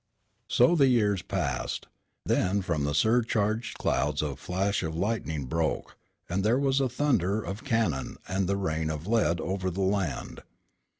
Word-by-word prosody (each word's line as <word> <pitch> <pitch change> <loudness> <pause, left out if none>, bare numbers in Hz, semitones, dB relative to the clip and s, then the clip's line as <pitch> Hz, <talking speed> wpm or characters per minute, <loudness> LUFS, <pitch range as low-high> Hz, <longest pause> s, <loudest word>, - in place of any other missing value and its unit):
So 125 +8 +4
the 140 -4 +5
years 105 -7 +3
passed. 75 -9 -2 0.4
Then 95 +2 +1
from 75 -5 -1
the 75 0 -1
surcharged 110 +3 +1
clouds 75 +3 0
a 70 -2 -2
flash 95 +7 -1
of 80 -2 -3
lightning 85 -7 -2
broke, 80 +3 -2 0.3
and 95 +3 -1
there 115 +4 +3
was 135 0 +2
the 135 -2 +1
thunder 110 - +1
of 100 +7 -6
cannon 110 - 0
and 95 0 0
the 100 - +1
rain 80 -4 -1
of 80 +1 -4
lead 105 -6 +2
over 95 +2 -2
the 95 +2 -3
land. 95 -4 -1
95 Hz, 160 wpm, -28 LUFS, 80-110 Hz, 0.4 s, the